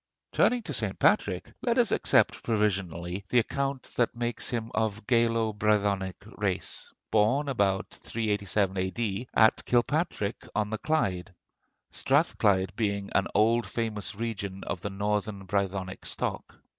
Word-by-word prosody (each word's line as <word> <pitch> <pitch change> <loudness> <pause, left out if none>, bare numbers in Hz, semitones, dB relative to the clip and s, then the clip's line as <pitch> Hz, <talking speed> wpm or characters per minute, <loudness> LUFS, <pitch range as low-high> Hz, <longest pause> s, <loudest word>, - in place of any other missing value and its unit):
Turning 245 -2 +3
to - - -5
St. - - -1
Patrick, - - +2
let 235 -1 +1
us 240 -3 +4
accept - - +3
provisionally 95 -4 -1
the 125 - +2
account 135 +3 0
that 120 0 +2
makes 120 0 -1
him 115 -2 -3
of 110 -1 -1
Gaelo 115 -2 +2
Brythonic 100 -3 +1 0.2
race, 100 -3 -2 0.2
born 115 +7 +3
about 100 -7 +1
387 105 -3 -1
A.D. 100 +4 -2
at 110 -1 +5
Kilpatrick 120 - 0
on 105 0 0
the 110 - -2
Clyde, 95 - -1 0.6
Strathclyde 95 -2 +2
being 100 -3 -1
an 100 - +2
old 115 +2 +3
famous 110 -3 -3
region 100 -3 -4
of 85 - -4
the 100 - -3
northern 100 0 -2
Brythonic 95 -1 -2
stock. - - -3
105 Hz, 130 wpm, -28 LUFS, 100-115 Hz, 0.6 s, at